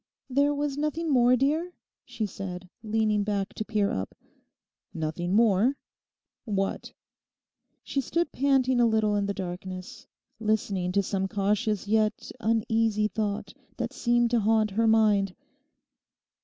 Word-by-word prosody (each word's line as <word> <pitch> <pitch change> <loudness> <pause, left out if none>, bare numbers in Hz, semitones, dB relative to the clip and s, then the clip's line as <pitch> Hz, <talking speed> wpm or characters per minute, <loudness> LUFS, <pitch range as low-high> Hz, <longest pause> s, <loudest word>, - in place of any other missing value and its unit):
'There 285 +3 +3
was 290 -1 -2
nothing 305 +2 -1
more, 250 -1 +5
dear?' 310 +7 0 0.3
She 240 -3 -3
said, 185 -2 -6
leaning 215 -1 +1
back 200 -1 -2
to - - -4
peer 210 -2 0
up. 95 0 -4 0.8
'"Nothing 165 +4 -2
more?" 230 +4 +3 0.7
What?' 195 -3 -2 0.9
She 275 - -1
stood 335 +5 -1
panting 260 -2 +2
a 235 - +5
little 220 -2 +2
in 200 -1 0
the 200 - -1
darkness, 185 0 -7 0.3
listening 205 -4 0
to 200 0 +2
some 195 0 -1
cautious 205 +1 0
yet 215 0 +1
uneasy 225 -1 +1
thought 210 -2 -3 0.2
that - - -3
seemed 240 -1 +2
to 240 - +3
haunt 215 0 +2
her 225 +3 +2
mind. 210 -4 +3
215 Hz, 130 wpm, -27 LUFS, 200-240 Hz, 0.9 s, more